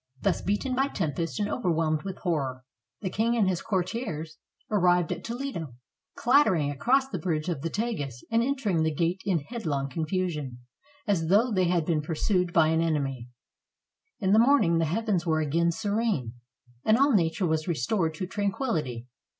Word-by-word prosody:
Thus 195 Hz, -, 0 dB
beaten 205 Hz, +7 st, -1 dB
by 270 Hz, +2 st, +2 dB
tempest 165 Hz, -, -3 dB
and 205 Hz, -, 0 dB
overwhelmed 165 Hz, -8 st, 0 dB
with 190 Hz, +1 st, -6 dB
horror, 135 Hz, -8 st, -1 dB, 0.4 s
the 190 Hz, -, -2 dB
king 230 Hz, +4 st, +1 dB
and 210 Hz, -4 st, +3 dB
his 185 Hz, -2 st, 0 dB
courtiers 185 Hz, -6 st, -3 dB, 0.3 s
arrived 180 Hz, -4 st, +3 dB
at 175 Hz, 0 st, -4 dB
Toledo, 230 Hz, -, -5 dB, 0.4 s
clattering 195 Hz, -, +3 dB
across 260 Hz, -, +2 dB
the 190 Hz, -9 st, -4 dB
bridge 155 Hz, 0 st, -1 dB
of 160 Hz, -6 st, -2 dB
the 165 Hz, -, -2 dB
Tagus 160 Hz, -, -3 dB
and 230 Hz, 0 st, +3 dB
entering 235 Hz, -10 st, 0 dB
the 160 Hz, -, +2 dB
gate 170 Hz, +4 st, 0 dB
in 180 Hz, -6 st, +1 dB
headlong 145 Hz, -, -3 dB
confusion, 155 Hz, -4 st, -2 dB, 0.5 s
as 185 Hz, -7 st, +1 dB
though 215 Hz, +7 st, +4 dB
they 185 Hz, -3 st, +2 dB
had 170 Hz, -2 st, +1 dB
been 155 Hz, -2 st, +1 dB
pur 160 Hz, +2 st, -4 dB
sued 180 Hz, +1 st, +1 dB
by 160 Hz, -2 st, +4 dB
an 160 Hz, 0 st, +2 dB
enemy. 135 Hz, -7 st, -1 dB, 0.9 s
In 190 Hz, -2 st, +1 dB
the 215 Hz, -, +6 dB
morning 230 Hz, -10 st, +4 dB
the 165 Hz, -, +2 dB
heavens 185 Hz, +1 st, -1 dB
were 160 Hz, -1 st, +2 dB
again 165 Hz, +3 st, +1 dB
serene, 205 Hz, -, -1 dB, 0.5 s
and 215 Hz, +1 st, +4 dB
all 275 Hz, +1 st, +4 dB
nature 180 Hz, -1 st, +2 dB
was 160 Hz, 0 st, 0 dB
restored 165 Hz, -, 0 dB
to 185 Hz, -, -3 dB
tranquillity. 180 Hz, -, -2 dB
175 Hz, 170 wpm, -27 LUFS, 155-215 Hz, 0.9 s, the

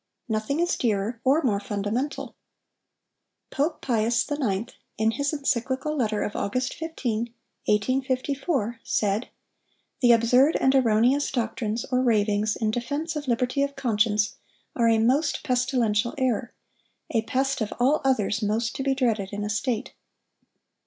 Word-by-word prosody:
Nothing 220 Hz, +6 st, -1 dB
is 345 Hz, +1 st, +1 dB
dearer 225 Hz, 0 st, -1 dB
or 280 Hz, +5 st, +3 dB
more 210 Hz, -6 st, +2 dB
fundamental. 210 Hz, +8 st, -3 dB, 1.2 s
Pope 305 Hz, +3 st, -1 dB
Pius 230 Hz, -1 st, +1 dB
IX., 235 Hz, -6 st, -1 dB, 0.2 s
in 220 Hz, +1 st, +2 dB
his 280 Hz, +5 st, -1 dB
Encyclical 275 Hz, 0 st, -1 dB
Letter 215 Hz, -6 st, 0 dB
of 205 Hz, -, -4 dB
August 255 Hz, +6 st, -1 dB
15, 240 Hz, -8 st, -3 dB, 0.4 s
1854, 260 Hz, -, 0 dB
said: 210 Hz, +3 st, 0 dB, 0.7 s
'The 245 Hz, -2 st, +6 dB
absurd 245 Hz, +6 st, +4 dB
and 265 Hz, -, +3 dB
erroneous 250 Hz, +2 st, +3 dB
doctrines 230 Hz, -2 st, -2 dB
or 255 Hz, 0 st, +3 dB
ravings 210 Hz, -3 st, +2 dB
in 220 Hz, -1 st, 0 dB
defense 285 Hz, +8 st, -3 dB
of 295 Hz, -2 st, -4 dB
liberty 250 Hz, +3 st, 0 dB
of 280 Hz, 0 st, -1 dB
conscience, 215 Hz, -5 st, +1 dB, 0.4 s
are 230 Hz, -1 st, +3 dB
a 225 Hz, -, +4 dB
most 255 Hz, +8 st, +1 dB
pestilential 245 Hz, -3 st, +1 dB
error—a 240 Hz, -1 st, -3 dB
pest, 265 Hz, +3 st, 0 dB
of 215 Hz, -, -1 dB
all 275 Hz, +5 st, +3 dB
others, 225 Hz, -5 st, +1 dB
most 220 Hz, +2 st, -1 dB
to -, -, -3 dB
be 270 Hz, 0 st, +1 dB
dreaded 225 Hz, -7 st, 0 dB
in 205 Hz, 0 st, -4 dB
a 210 Hz, -, -2 dB
State. 230 Hz, +2 st, -2 dB
240 Hz, 135 wpm, -25 LUFS, 215-270 Hz, 1.2 s, The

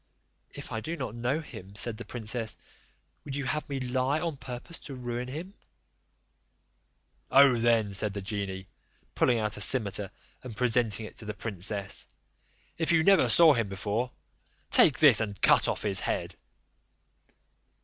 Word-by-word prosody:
"If -, -, -9 dB
I 110 Hz, -, -2 dB
do 165 Hz, +8 st, -5 dB
not 130 Hz, -7 st, -5 dB
know 125 Hz, +6 st, -1 dB
him," 100 Hz, -, -11 dB
said 110 Hz, +1 st, -3 dB
the 120 Hz, -, -8 dB
princess, 115 Hz, -1 st, -4 dB, 0.7 s
"would 140 Hz, -2 st, -6 dB
you 140 Hz, -1 st, -3 dB
have 150 Hz, +5 st, -2 dB
me 140 Hz, -1 st, -3 dB
lie 130 Hz, +3 st, 0 dB
on 165 Hz, -2 st, -3 dB
purpose 130 Hz, +5 st, -8 dB
to 140 Hz, -, -8 dB
ruin 120 Hz, 0 st, -4 dB
him?" 165 Hz, +9 st, -7 dB, 1.8 s
"Oh 135 Hz, -2 st, +6 dB
then," 115 Hz, -3 st, +2 dB
said 105 Hz, +1 st, -3 dB
the 100 Hz, -, -4 dB
genie, 95 Hz, -2 st, -4 dB, 0.5 s
pulling 120 Hz, -, +2 dB
out 105 Hz, -2 st, -2 dB
a -, -, -6 dB
cimeter 105 Hz, -5 st, 0 dB, 0.3 s
and 120 Hz, -4 st, -9 dB
presenting 115 Hz, -3 st, +1 dB
it -, -, -12 dB
to 110 Hz, -, -9 dB
the 105 Hz, 0 st, -5 dB
princess, 100 Hz, -1 st, -3 dB, 0.7 s
"if 165 Hz, -, +1 dB
you 160 Hz, -1 st, +4 dB
never 195 Hz, +2 st, +5 dB
saw 165 Hz, -3 st, +7 dB
him 115 Hz, -6 st, -1 dB
before, 105 Hz, +5 st, -2 dB, 0.6 s
take 150 Hz, -, +7 dB
this, 140 Hz, -8 st, +6 dB
and 105 Hz, -2 st, -4 dB
cut -, -, +4 dB
off -, -, -2 dB
his 100 Hz, -3 st, +1 dB
head." -, -, -2 dB
120 Hz, 160 wpm, -28 LUFS, 105-135 Hz, 1.8 s, saw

